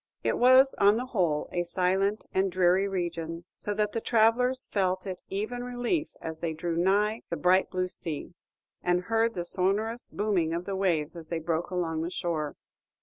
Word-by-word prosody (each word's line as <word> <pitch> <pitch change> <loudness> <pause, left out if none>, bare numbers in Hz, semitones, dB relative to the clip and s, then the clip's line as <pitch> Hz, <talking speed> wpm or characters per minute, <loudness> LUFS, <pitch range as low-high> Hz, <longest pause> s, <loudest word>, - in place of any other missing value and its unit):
It - - 0
was, 255 +2 +6
on 205 +2 +5
the 250 - -2
whole, 175 -11 0
a 175 - 0
silent 190 +4 0
and 190 0 +1
dreary 185 +2 +3
region, 170 -3 -3
so 210 - -4
that 210 0 0
the 230 - -2
travellers 245 +4 +3
felt 185 -2 0
it 185 -2 -5
even 220 +5 -3
relief 245 +6 -2
as 160 0 -6
they 165 -1 -2
drew 165 +1 -3
nigh 205 +6 +2
the - - -2
bright 185 +1 +3
blue 185 -1 -1
sea, 165 -2 -6 0.5
and 180 0 +1
heard 225 +3 +1
the 175 -1 -3
sonorous 205 +7 0
booming 190 -6 0
of 170 +1 -3
the 195 - -3
waves 170 -5 0
as 165 -2 -8
they 170 - -1
broke 165 +1 -2
along 165 -3 -1
the 165 - -2
shore. 160 -4 -3
185 Hz, 185 wpm, -28 LUFS, 170-215 Hz, 0.5 s, was